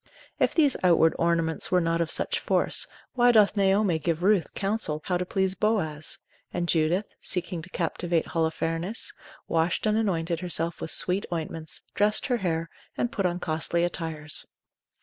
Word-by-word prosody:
If - - +2
these 295 -5 +4
outward 165 -2 +5
ornaments 165 -1 +1
were 180 - +4
not 165 0 0
of 165 - -1
such - - 0
force, - - +2 0.3
why 245 -1 +5
doth 215 -3 +5
Naomi 195 -3 +2
give 165 +1 -1
Ruth 200 -3 +2
counsel 195 -7 -2
how 180 - 0
to 180 0 -2
please 190 0 +1
Boaz? 185 -8 -1 0.3
and 175 - -2
Judith, 170 +5 +1
seeking 180 -2 0
to 170 - -11
captivate 170 -1 -1
Holofernes, 165 +4 -1 0.3
washed 165 +4 0
and 215 0 +2
anointed 170 -6 0
herself 170 -2 -2
with - - -1
sweet 185 +4 +2
ointments, 160 -1 -5
dressed 210 +1 +2
her 250 -3 +1
hair, 165 -5 -1 0.3
and 240 - 0
put 195 -8 0
on 175 0 -3
costly 165 +1 -1
attires. 160 -3 -2
175 Hz, 160 wpm, -26 LUFS, 165-195 Hz, 0.3 s, outward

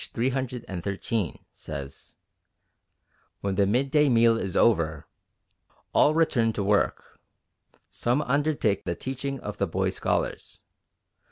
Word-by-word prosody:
313) 115 -6 -2
says, 70 0 -9 1.2
"When 100 -1 -1
the 100 0 +2
midday 140 +6 +3
meal 115 -1 +5
is 95 -5 -2
over, 80 -9 +2 0.9
all 150 - +4
return 135 -9 +2
to 100 - -2
work. 100 +1 0 0.7
Some 125 +5 0
undertake 140 -7 +1
the 85 - -2
teaching 135 +5 -4
of 105 0 -6
the 100 - +1
boy 80 - 0
scholars. - - -3
115 Hz, 105 wpm, -26 LUFS, 100-135 Hz, 1.2 s, meal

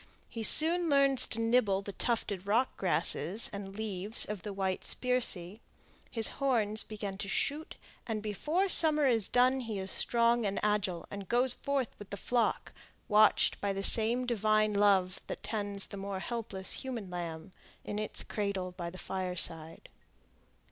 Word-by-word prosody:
He 230 - -8
soon 330 +8 +7
learns 275 -2 +3
to 225 - -4
nibble 225 -4 +1
the 200 - -7
tufted 200 -3 -3
rock 235 +5 0
grasses 185 +1 +1
and 195 -1 -8
leaves 210 0 0
of 210 -3 -6
the 210 - -7
white 190 -1 -3
spirsea; 220 -7 -2 0.5
his 225 -2 +2
horns 220 -6 0
begin 205 -2 -7
to 200 - -5
shoot, 295 +9 -3 0.3
and 215 -2 -4
before 305 - -1
summer 305 -5 +5
is 225 -6 +2
done 255 +2 +2
he 225 -5 -5
is 190 0 -5
strong 235 0 +2
and 200 -1 -2
agile, 205 -4 -1
and 200 -1 -8
goes 245 +1 +3
forth 275 -3 -3
with 205 - -11
the 200 - -6
flock, 240 +3 -2 0.4
watched 210 0 +3
by 200 -1 -1
the 195 0 -4
same 235 +4 +7
divine 215 -2 +1
love 195 -2 +1
that - - -7
tends 205 -2 -3
the 200 - -10
more 195 0 -5
helpless 200 -4 -5
human 235 -8 -6
lamb 170 -1 -7 0.3
in 205 - -5
its 215 - -3
cradle 200 -3 -4
by 175 -1 -7
the 185 - -12
fireside. 180 -4 -5
210 Hz, 160 wpm, -30 LUFS, 195-240 Hz, 0.5 s, soon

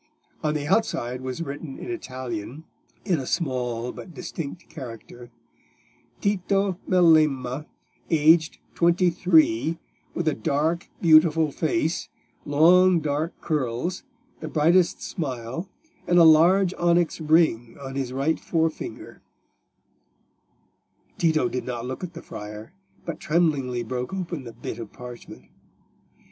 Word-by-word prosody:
On 155 -1 0
the 145 -1 -2
outside 130 - 0
was 130 +5 -4
written 145 -1 -7
in 360 - -6
Italian, 130 - -6 0.4
in 175 -6 +1
a 130 - -6
small 125 -6 -2
but 175 - -11
distinct 165 -1 -7
character— 120 -2 -10 0.9
"_Tito 195 -1 0
Melema, 155 -6 +3 0.4
aged 160 0 +4 0.2
twenty 175 +1 +3
three, 160 -4 +3 0.4
with 175 - -2
a 155 - +3
dark, 155 - -1
beautiful 160 -2 +5
face, 165 +2 -1 0.4
long 175 +5 +5
dark 155 +2 -2
curls, 150 +3 -2 0.4
the - - -6
brightest 170 +3 +2
smile, 135 +3 -5 0.4
and 175 - +3
a 170 - +8
large 175 +4 +6
onyx 170 -1 +2
ring 155 -8 +2
on 135 -1 -7
his 135 -2 -3
right 140 +5 0
forefinger_." 165 - -3 2.0
Tito 165 -1 +2
did 130 -8 -3
not 120 -2 -4
look 130 +7 -6
at 180 -1 -6
the 170 - -9
friar, 105 +7 -9 0.3
but 170 -3 -5
tremblingly 145 -7 0
broke 125 +8 -4
open 170 -7 -5
the 115 - -9
bit 120 - -7
of 115 -3 -8
parchment. 125 -1 -11
155 Hz, 120 wpm, -25 LUFS, 130-170 Hz, 2.0 s, a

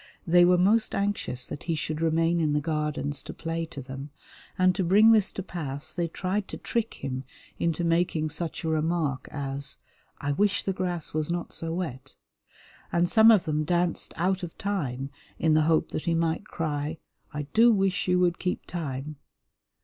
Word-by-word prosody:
They 175 +1 +6
were 180 0 +5
most 210 +5 +3
anxious 200 -11 -1
that - - -7
he 165 - +2
should 155 +1 -3
remain 165 +1 +2
in 155 -2 +1
the 150 - +2
Gardens 150 -2 -2
to - - -9
play 165 0 -3
to 140 -4 -8
them, 135 +2 -7 0.5
and 185 0 +4
to 190 +1 -1
bring 205 +6 +6
this 215 -4 +4
to 195 - -4
pass 145 -6 -5
they 175 -1 -1
tried 190 +4 -2
to - - -6
trick 230 -1 -2
him 130 -1 -4 0.4
into 170 0 0
making 165 -2 +1
such 160 +2 -3
a - - -2
remark 155 -4 0
as 140 -1 -2 0.4
"I 145 - -2
wish 200 +7 +2
the 195 - -1
grass 180 -3 -3
was 155 0 -1
not 175 0 -3
so 165 0 -4
wet," 135 -7 -5 0.8
and 175 0 +2
some 220 +5 +7
of 215 -5 +5
them 155 -1 0
danced 175 +1 0
out 185 +3 +1
of 175 -2 -7
time 140 -10 -2 0.3
in 160 -1 +2
the 155 - +5
hope 160 - +2
that - - -4
he 170 -1 +2
might 165 +4 0
cry, 155 -3 -3 0.3
"I 150 0 -3
do 235 +2 +6
wish 195 -3 +1
you 180 0 +3
would 175 -1 +2
keep 180 - -2
time!" 150 -3 -5
165 Hz, 190 wpm, -27 LUFS, 150-180 Hz, 0.8 s, some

